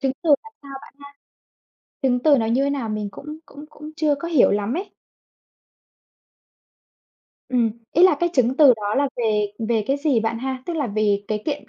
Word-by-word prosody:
Chứng 270 -2 0
từ 330 - 0
làm 445 0 -15
sao 280 - -13
bạn - - -15 0.9
ha? - - -
Chứng 250 -2 +2
từ 290 -3 +5
nó 225 - 0
như 250 +5 +1
thế 280 - 0
nào 270 -5 -3
mình 215 -1 -3
cũng 300 +8 -9
cũng 290 +2 -12
cũng 300 +1 -11
chưa 300 -3 +1
có 335 +4 -6
hiểu 310 -7 +4
lắm 205 +4 -1
ấy. 380 +4 -6 2.5
Ừm, 240 -3 +1 0.2
ý 345 - +3
là 370 -4 +7
cái 345 - +2
chứng 255 -3 +1
từ 275 -5 +7
đó 210 -1 -3
là 280 0 +1
về 210 -3 0 0.2
về 220 -3 0
cái 275 - +1
gì 285 -6 +1
bạn 225 +1 -2
ha, 260 +1 -5
tức 345 - -3
là 290 -5 -1
về 205 -1 0
cái 215 -1 -2
kiện 290 -1 -4
260 Hz, 205 wpm, -21 LUFS, 220-295 Hz, 2.5 s, là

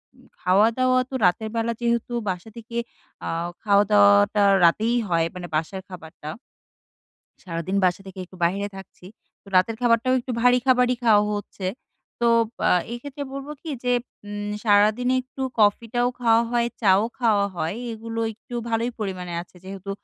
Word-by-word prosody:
উম 255 0 -21 0.2
খাওয়া-দাওয়া 230 +7 +3
তো - - -13
রাতেরবেলা 225 +5 0
যেহেতু 235 0 0 0.2
বাসা 180 +3 -4
থেকে 230 +1 -7 0.5
আ - - -3 0.3
খাওয়া-দাওয়াটা 205 0 +5 0.2
রাতেই 220 +8 +3
হয়, 165 -1 +2
মানে 180 -1 -6
বাসার 165 +5 -2
খাবারটা। 160 -4 -10 1.2
সারাদিন 170 +2 -3
বাসা 180 +1 0
থেকে 190 0 -10
একটু 185 +1 -16
বাইরে 200 +4 0
থাকছি। 190 -1 -12 0.4
তো - - -24
রাতের 185 +5 +3
খাবারটাও 240 +1 +3
একটু 250 +1 -6
ভারী 245 +1 +5
খাবারই 250 -1 +3
খাওয়া 210 -3 +5
হচ্ছে। 205 -2 -7 0.6
তো - - +3 0.4
আ - - +4 0.2
এক্ষেত্রে 285 +4 -6
বলব 275 0 -6
কি 325 - -7
যে 250 - +1 0.4
উম 205 0 -5
সারাদিনে 215 +4 +3
একটু 260 +1 -10 0.2
কফিটাও 230 +3 +2
খাওয়া 230 -1 +4
হয়, 235 -1 +2
চাও 195 -1 +4 0.2
খাওয়া 215 -5 +3
হয়। 165 +2 -2 0.2
এগুলো 225 0 -6
একটু 245 +4 -15 0.2
ভালোই 230 +2 0
পরিমাণে 185 -4 -4
আছে। 175 - -17
যেহেতু 195 +1 -8
215 Hz, 145 wpm, -24 LUFS, 190-240 Hz, 1.2 s, খাওয়া-দাওয়াটা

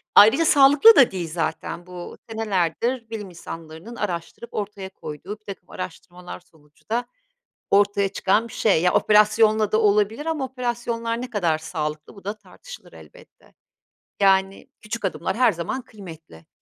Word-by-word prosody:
Ayrıca 255 +11 +7
sağlıklı 290 +9 +7
da 265 - +6
değil 175 -4 -4
zaten 170 +1 -4
bu 180 -1 -9
senelerdir 225 +3 -1
bilim 210 -4 -6
insanlarının 165 +5 -10
araştırıp 180 +3 -5
ortaya 200 -2 -5
koyduğu 190 +5 -8
birtakım 195 -4 -10
araştırmalar 180 0 -8
sonucu 155 -2 -28
da 240 +2 0 0.7
ortaya 200 0 +3
çıkan 200 +4 +1
bir - - -13
şey. 195 -7 +2
Ya, 180 - +3
operasyonla 215 0 +4
da 215 - +3
olabilir 210 +7 +1
ama 310 -4 -1
operasyonlar 240 -2 -3
ne 250 - -6
kadar 175 -8 0
sağlıklı 155 -1 -5
bu 200 - -15
da 205 +2 -3
tartışılır, 485 - -14
elbette. - - -18 0.7
Yani, 195 0 +2
küçük 215 0 -5
adımlar 190 0 -2
her 250 -3 +4
zaman 175 +10 -4
kıymetli. 165 - -13
205 Hz, 140 wpm, -23 LUFS, 175-230 Hz, 0.7 s, Ayrıca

